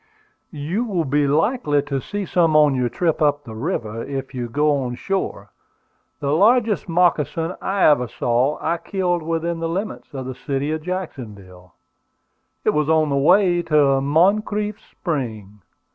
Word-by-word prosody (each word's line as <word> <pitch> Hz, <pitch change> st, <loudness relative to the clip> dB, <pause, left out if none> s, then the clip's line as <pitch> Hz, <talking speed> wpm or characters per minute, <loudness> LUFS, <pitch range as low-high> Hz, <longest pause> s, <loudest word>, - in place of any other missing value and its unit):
"You 165 Hz, +8 st, -3 dB
will 190 Hz, -9 st, -1 dB
be 145 Hz, +1 st, +1 dB
likely 150 Hz, -, +1 dB
to 140 Hz, -2 st, -3 dB
see 205 Hz, +8 st, -4 dB
some 165 Hz, -3 st, +2 dB
on 150 Hz, -2 st, +5 dB
your 125 Hz, -2 st, 0 dB
trip 165 Hz, +2 st, -1 dB
up 145 Hz, -1 st, +2 dB
the 110 Hz, -, -9 dB
river, 115 Hz, -, -3 dB
if 135 Hz, -1 st, -5 dB
you 120 Hz, -2 st, -4 dB
go 150 Hz, +4 st, +2 dB
on 125 Hz, -1 st, -3 dB
shore. 195 Hz, +9 st, -3 dB, 0.7 s
The 140 Hz, -1 st, -1 dB
largest 215 Hz, +2 st, +3 dB
moccasin 165 Hz, -1 st, +1 dB
I 195 Hz, 0 st, 0 dB
ever 125 Hz, -5 st, +4 dB
saw 125 Hz, +6 st, 0 dB
I 170 Hz, +2 st, -1 dB
killed 180 Hz, -2 st, -1 dB
within 165 Hz, +1 st, -2 dB
the 165 Hz, 0 st, -2 dB
limits 195 Hz, +6 st, -4 dB
of 130 Hz, -1 st, -5 dB
the 130 Hz, -, -5 dB
city 140 Hz, +3 st, -3 dB
of 155 Hz, 0 st, -2 dB
Jacksonville. 105 Hz, -, -7 dB, 0.9 s
It -, -, +4 dB
was 150 Hz, 0 st, 0 dB
on 160 Hz, -1 st, +3 dB
the 140 Hz, -, 0 dB
way 175 Hz, +5 st, +4 dB
to 145 Hz, -4 st, +3 dB
Moncrief's 205 Hz, +8 st, +1 dB
Spring. 110 Hz, -, -5 dB
150 Hz, 160 wpm, -21 LUFS, 135-175 Hz, 0.9 s, on